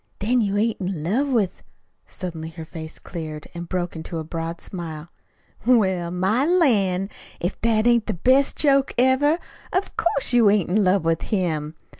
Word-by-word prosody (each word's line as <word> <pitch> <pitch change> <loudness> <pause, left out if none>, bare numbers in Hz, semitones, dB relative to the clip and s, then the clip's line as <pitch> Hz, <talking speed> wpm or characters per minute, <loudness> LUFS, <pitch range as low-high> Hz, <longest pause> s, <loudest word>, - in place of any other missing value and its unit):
"Then 240 +4 +1
you 205 -1 0
ain't 220 0 0
in 180 -4 -3
love 245 - +1
with 220 -8 0 0.2
" - - -47
Suddenly 165 -4 -6
her 165 -1 -9
face 160 -1 -8
cleared, 155 -3 -7
and 170 0 -7
broke 175 -2 -2
into 160 +1 -6
a 160 - -3
broad 165 +1 -5
smile. 165 -3 -7 0.5
"Well, 190 -8 +3
my 190 +8 +1
lan', 215 - +2 0.3
if 175 +3 -3
that 220 -1 +2
ain't 235 -3 +3
the - - -1
best 260 +9 +3
joke 275 -2 +3
ever! 260 +5 +4 0.3
Of 375 +2 -1
course, 280 -6 +1
you 235 -4 +6
ain't 200 -4 +2
in 210 +2 +3
love 185 -2 +2
with 165 0 +1
him! 160 -7 -2
190 Hz, 175 wpm, -23 LUFS, 170-240 Hz, 0.5 s, you